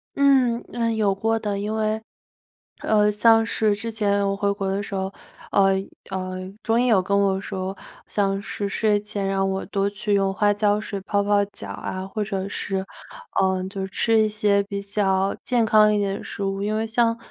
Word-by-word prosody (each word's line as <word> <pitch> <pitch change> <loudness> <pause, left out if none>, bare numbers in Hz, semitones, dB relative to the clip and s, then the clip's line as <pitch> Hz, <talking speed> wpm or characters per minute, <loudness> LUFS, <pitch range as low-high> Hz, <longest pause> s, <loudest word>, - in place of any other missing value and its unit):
嗯， 265 -4 +4
呃， 230 -1 0
有 205 -3 +1
过 225 +3 0
的， 205 -2 -2
因 210 +2 -3
为， 215 0 0 0.8
呃， 210 -1 +3
像 225 +2 +5
是 215 -2 +1
之 225 +3 -5
前 200 -2 +1
我 195 - 0
回 200 0 0
国 195 -1 -3
的 195 +1 -1
时 200 - -8
候， 190 0 -2 0.4
呃 195 -1 +4 0.4
呃， 185 -1 -3 0.2
中 225 +1 +1
医 250 - +2
有 220 -6 +4
跟 200 +2 +1
我 195 -1 +1
说， 190 -1 -4 0.3
像 195 -1 0
是 200 0 -4
睡 210 0 +2
前 205 -1 -4
让 195 0 +1
我 190 0 -2
多 200 -1 0
去 205 +1 -2
用 195 -1 +2
花 205 +1 +2
椒 205 0 +2
水 200 -2 -5
泡 200 +1 0
泡 205 0 +3
脚 205 - -10
啊， 185 0 -5
或 210 +2 -3
者 195 -2 -3
是， 195 -1 -3 0.6
呃， 190 -1 +1
就 190 -1 -4
吃 225 +3 +2
一 215 - +2
些 205 -1 +2
比 200 0 -5
较 195 -1 0
健 240 -2 +2
康 215 -1 +5
一 210 - +2
点 200 -1 -1
的 - - -9
食 200 - -5
物。 195 0 -2
因 210 +1 -1
为 220 +1 0
像 230 +1 +1
205 Hz, 215 characters per minute, -23 LUFS, 195-215 Hz, 0.8 s, 像